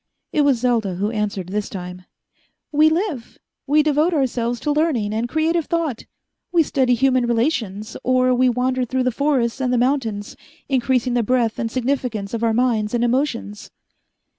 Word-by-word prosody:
It 300 Hz, -, +3 dB
was 275 Hz, -5 st, +2 dB
Selda 230 Hz, -7 st, +1 dB
who 205 Hz, +4 st, -1 dB
answered 205 Hz, -4 st, -3 dB
this 205 Hz, +1 st, -2 dB
time. 180 Hz, -1 st, -8 dB, 0.7 s
"We 305 Hz, +1 st, +5 dB
live. 320 Hz, -, -3 dB, 0.3 s
We 300 Hz, +2 st, +4 dB
devote 305 Hz, +3 st, +2 dB
ourselves 245 Hz, -4 st, -1 dB
to 300 Hz, -, 0 dB
learning 290 Hz, -9 st, 0 dB
and 230 Hz, +2 st, -2 dB
creative 320 Hz, +2 st, +1 dB
thought. 330 Hz, -8 st, -2 dB, 0.5 s
We 340 Hz, -2 st, +4 dB
study 260 Hz, -4 st, +1 dB
human 255 Hz, 0 st, +2 dB
relations, 230 Hz, -4 st, -1 dB
or 255 Hz, 0 st, +3 dB
we 255 Hz, +1 st, +3 dB
wander 255 Hz, +1 st, 0 dB
through 255 Hz, +1 st, -1 dB
the 255 Hz, -, +1 dB
forests 265 Hz, -2 st, 0 dB
and 250 Hz, -1 st, 0 dB
the 250 Hz, -, +2 dB
mountains, 235 Hz, -5 st, -1 dB, 0.3 s
increasing 255 Hz, -2 st, +1 dB
the 240 Hz, -, +2 dB
breadth 235 Hz, -1 st, 0 dB
and 230 Hz, -, -1 dB
significance 245 Hz, -5 st, -2 dB
of 230 Hz, 0 st, -2 dB
our 230 Hz, -, +3 dB
minds 225 Hz, -2 st, +1 dB
and 240 Hz, -, +1 dB
emotions." 240 Hz, -4 st, -1 dB
250 Hz, 165 wpm, -21 LUFS, 225-275 Hz, 0.7 s, We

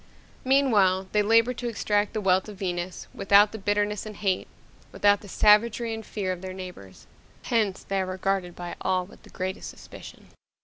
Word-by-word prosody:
Meanwhile, 210 Hz, -9 st, +3 dB
they 210 Hz, -, +3 dB
labor 230 Hz, +4 st, +4 dB
to 245 Hz, 0 st, -5 dB
extract 210 Hz, -2 st, 0 dB
the 215 Hz, -, -2 dB
wealth 190 Hz, +1 st, +2 dB
of 205 Hz, -, -10 dB
Venus 180 Hz, -1 st, -4 dB
without 200 Hz, +1 st, +5 dB
the 220 Hz, -, -7 dB
bitterness 205 Hz, +1 st, 0 dB
and 215 Hz, -1 st, -8 dB
hate, 195 Hz, -3 st, -1 dB, 0.4 s
without 205 Hz, -1 st, +3 dB
the 205 Hz, -, -12 dB
savagery 220 Hz, +3 st, +3 dB
and 225 Hz, 0 st, -6 dB
fear 200 Hz, -3 st, -3 dB
of 180 Hz, -1 st, -5 dB
their 185 Hz, 0 st, -7 dB
neighbors. 180 Hz, -, -10 dB, 0.4 s
Hence, 215 Hz, -5 st, 0 dB
they 195 Hz, -1 st, -1 dB
are 185 Hz, -, -3 dB
regarded 185 Hz, -1 st, -2 dB
by 175 Hz, -1 st, -6 dB
all 185 Hz, -1 st, 0 dB
with 190 Hz, -, -17 dB
the -, -, -17 dB
greatest 185 Hz, 0 st, -5 dB
suspicion. -, -, -13 dB
200 Hz, 180 wpm, -26 LUFS, 185-215 Hz, 0.4 s, without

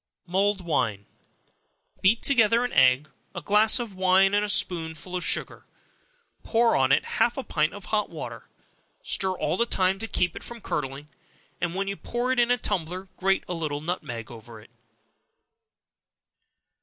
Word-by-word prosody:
Mulled 195 Hz, +2 st, +1 dB
Wine. 110 Hz, -, -1 dB, 1.0 s
Beat 215 Hz, +5 st, +3 dB
together 235 Hz, -2 st, +4 dB
an 245 Hz, -, -5 dB
egg, 130 Hz, +3 st, +4 dB, 0.3 s
a -, -, -4 dB
glass 210 Hz, +1 st, +4 dB
of 235 Hz, -5 st, -5 dB
wine, 190 Hz, +1 st, +3 dB
and 205 Hz, 0 st, +3 dB
a 210 Hz, -, -2 dB
spoonful 180 Hz, -3 st, 0 dB
of 180 Hz, -, -2 dB
sugar; -, -, -2 dB, 0.7 s
pour 230 Hz, 0 st, +2 dB
on 130 Hz, 0 st, +2 dB
it -, -, +3 dB
half 240 Hz, -, 0 dB
a 270 Hz, -, -3 dB
pint 155 Hz, -5 st, 0 dB
of 205 Hz, -, -10 dB
hot 210 Hz, -1 st, -1 dB
water; -, -, -8 dB, 0.5 s
stir 190 Hz, -, 0 dB
all -, -, -1 dB
the 235 Hz, -, +1 dB
time 190 Hz, -2 st, +1 dB
to 225 Hz, -, -5 dB
keep 175 Hz, -4 st, -1 dB
it -, -, -7 dB
from 235 Hz, 0 st, -8 dB
curdling, 140 Hz, -6 st, -4 dB, 0.5 s
and 170 Hz, 0 st, -2 dB
when 195 Hz, +1 st, -2 dB
you 200 Hz, -, -2 dB
pour 240 Hz, +5 st, -3 dB
it 260 Hz, -, +1 dB
in 240 Hz, 0 st, +3 dB
a 245 Hz, -, +3 dB
tumbler, 185 Hz, -3 st, -3 dB
grate 195 Hz, +1 st, +1 dB
a -, -, -3 dB
little 155 Hz, -4 st, -3 dB
nutmeg 120 Hz, -9 st, -5 dB
over 115 Hz, -1 st, -11 dB
it. 110 Hz, +2 st, -18 dB
190 Hz, 170 wpm, -26 LUFS, 155-215 Hz, 1.0 s, together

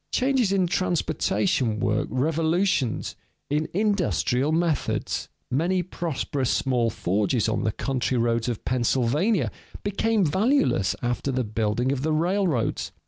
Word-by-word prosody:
Changes 255 Hz, -5 st, +2 dB
in 195 Hz, -2 st, +2 dB
transportation 170 Hz, -, 0 dB
work 105 Hz, +2 st, 0 dB
revolutions 160 Hz, -, 0 dB, 0.4 s
in 150 Hz, +1 st, 0 dB
industrial 155 Hz, -, +1 dB
methods. 165 Hz, -3 st, -1 dB, 0.2 s
Many 175 Hz, +7 st, +1 dB
prosperous 155 Hz, -6 st, -2 dB
small 125 Hz, -4 st, +1 dB
forges 105 Hz, +3 st, 0 dB
on 110 Hz, -, -1 dB
the 110 Hz, -, +2 dB
country 130 Hz, +2 st, -1 dB
roads 115 Hz, 0 st, +1 dB
of 115 Hz, -, -5 dB
Pennsylvania 130 Hz, -, +1 dB, 0.3 s
became 205 Hz, 0 st, +1 dB
valueless 190 Hz, -, +2 dB
after 120 Hz, +3 st, -1 dB
the 130 Hz, 0 st, 0 dB
building 110 Hz, +3 st, 0 dB
of 135 Hz, -2 st, -1 dB
the 155 Hz, +2 st, 0 dB
railroads. 170 Hz, -, 0 dB
140 Hz, 120 wpm, -25 LUFS, 120-185 Hz, 0.4 s, Changes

